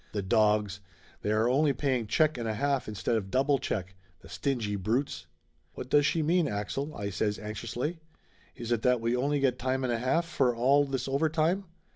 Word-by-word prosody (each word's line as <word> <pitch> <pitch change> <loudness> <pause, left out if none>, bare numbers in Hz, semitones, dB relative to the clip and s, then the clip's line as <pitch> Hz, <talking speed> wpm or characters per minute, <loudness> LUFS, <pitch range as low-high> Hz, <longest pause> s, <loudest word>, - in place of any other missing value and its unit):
"The 100 -2 -2
dogs! 105 0 +2 0.4
They 105 - -1
are 110 +2 +2
only 140 +3 +3
paying 130 -4 -1
check 155 +7 +2
and 120 -2 -4
a 110 - -1
half 140 +3 0
instead 105 +1 -1
of 95 -3 -4
double 135 +5 +2
check! 95 -4 -3 0.3
The 80 - -15
stingy 115 -3 -2
brutes!" 115 +8 -2 0.5
"What - - -8
does 145 -1 +5
she 160 +2 +1
mean, 170 +1 +2
Axel?" 120 +9 -3
I 100 0 -4
says 105 +2 -1
anxiously. 120 +9 -4 0.6
"Is 120 -2 -6
it 115 -2 +1
that 125 0 +3
we 115 +2 0
only 140 +3 0
get 130 -2 +1
time 130 +1 -1
and 125 -2 0
a 115 - -1
half 165 +8 +1
for 130 -7 +1
all 135 +5 +4
this 135 -2 -3
over 140 +4 +1
time? 165 +5 +1
125 Hz, 200 wpm, -29 LUFS, 110-140 Hz, 0.6 s, does